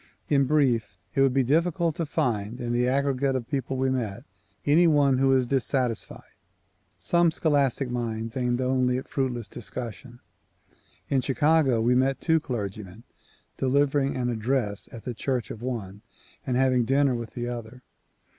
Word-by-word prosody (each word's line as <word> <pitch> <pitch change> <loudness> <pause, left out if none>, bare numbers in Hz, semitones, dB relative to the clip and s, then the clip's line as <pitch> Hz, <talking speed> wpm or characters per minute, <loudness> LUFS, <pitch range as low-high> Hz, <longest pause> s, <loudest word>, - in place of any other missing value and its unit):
In 140 -2 +3
brief, 125 -8 +1 0.2
it 135 - +2
would 135 -1 +4
be 135 +1 +2
difficult 165 +4 +1
to 165 - -2
find 110 -3 -1
in 120 0 -2
the 120 +1 +2
aggregate 135 0 +1
of 120 -3 -3
people 135 -2 -2
we 130 0 +1
met, 120 -3 -3 0.4
any 165 +4 +5
one 140 -4 +3
who 135 - +3
was 130 -1 +3
dissatisfied. 125 -2 -1 0.7
Some 170 -1 +3
scholastic 140 -5 +1
minds 115 -2 -3
aimed 125 -1 0
only 130 -1 +1
at 130 - -6
fruitless 125 -5 -2
dis 120 - -8
cussion. 120 0 -7 0.9
In 135 -2 +2
Chicago 140 -2 +2
we 120 +2 +3
met 130 +2 +2
two 160 -1 +2
clergymen, 105 - -6 0.3
— - - -35
delivering 140 +1 +1
an 125 -1 -1
address 115 -2 -1
at 115 - -10
the 125 - -4
church 125 +1 -2
of 110 - -8
one 105 -6 -5 0.5
and 125 -1 +1
having 130 -2 +3
dinner 135 +2 +2
with 115 -2 -6
the 120 -1 -3
other. 120 +1 -7
130 Hz, 165 wpm, -26 LUFS, 120-140 Hz, 0.9 s, any